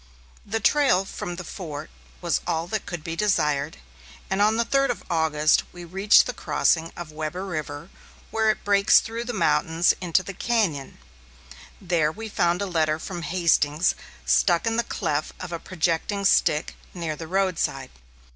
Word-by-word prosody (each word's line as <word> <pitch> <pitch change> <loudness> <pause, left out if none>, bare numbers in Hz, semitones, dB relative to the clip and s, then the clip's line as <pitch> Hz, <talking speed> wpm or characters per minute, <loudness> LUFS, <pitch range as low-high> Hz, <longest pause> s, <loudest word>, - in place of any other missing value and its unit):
The 225 +2 -2
trail 225 -6 +3
from 175 -2 -6
the 180 - -7
fort 155 -4 -7 0.3
was 170 -3 0
all 165 0 0
that 215 0 -3
could 175 -3 -5
be 165 0 -4
desired, 155 -7 0 0.5
and 190 +1 +1
on 215 +2 +3
the 235 - +1
third 275 +3 +2
of 245 - -3
August, 155 -2 +3
we 175 -1 -10
reached 195 +5 +5
the 250 - -3
crossing 165 -7 +1
of 170 -3 -7
Webber 155 +5 -4
River, 155 -2 -5 0.4
where 220 0 +2
it 215 - 0
breaks 200 0 +5
through 230 +1 -5
the 245 - -3
mountains 170 -4 +2
into 180 +1 +1
the 195 - -7
cañon. 190 - -1 0.9
There 170 -5 +1
we 220 +6 -8
found 175 -1 +1
a - - -1
letter 160 -4 +1
from 175 +2 -6
Hastings 170 -2 +2 0.3
stuck 115 - +3
in 225 0 0
the 235 - +1
cleft 150 -7 -2
of 180 -1 -7
a 170 - -4
projecting 180 +4 -1
stick 150 -4 +2 0.2
near 165 -3 -3
the 160 +1 -8
roadside. 175 -8 -1
175 Hz, 165 wpm, -24 LUFS, 160-200 Hz, 0.9 s, reached